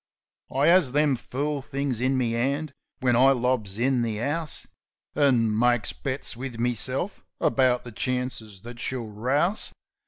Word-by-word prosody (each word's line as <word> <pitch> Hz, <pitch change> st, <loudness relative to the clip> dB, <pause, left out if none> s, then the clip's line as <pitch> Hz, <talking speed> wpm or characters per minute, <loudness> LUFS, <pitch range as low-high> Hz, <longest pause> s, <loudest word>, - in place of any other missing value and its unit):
I 135 Hz, +3 st, +2 dB
'as 170 Hz, -7 st, +4 dB
them 145 Hz, -2 st, +3 dB
fool 140 Hz, +4 st, -3 dB
things 135 Hz, -3 st, -2 dB
in 130 Hz, +1 st, +2 dB
me 120 Hz, -2 st, 0 dB
'and 140 Hz, +5 st, -1 dB, 0.3 s
when 125 Hz, -2 st, +3 dB
I 135 Hz, +3 st, +6 dB
lobs 120 Hz, -6 st, -1 dB
in 125 Hz, +1 st, +2 dB
the 110 Hz, -3 st, -2 dB
'ouse, 150 Hz, +5 st, -1 dB, 0.5 s
An' 125 Hz, -7 st, +3 dB
makes 120 Hz, -2 st, +2 dB
bets 135 Hz, -2 st, -3 dB
wiv 125 Hz, -1 st, -6 dB
meself 125 Hz, -, -1 dB, 0.2 s
about 130 Hz, -2 st, +2 dB
the 120 Hz, -, -9 dB
chances 120 Hz, -4 st, -3 dB
that 120 Hz, +1 st, -10 dB
she'll 125 Hz, -2 st, -3 dB
rouse. 130 Hz, -, 0 dB
130 Hz, 150 wpm, -26 LUFS, 120-140 Hz, 0.5 s, I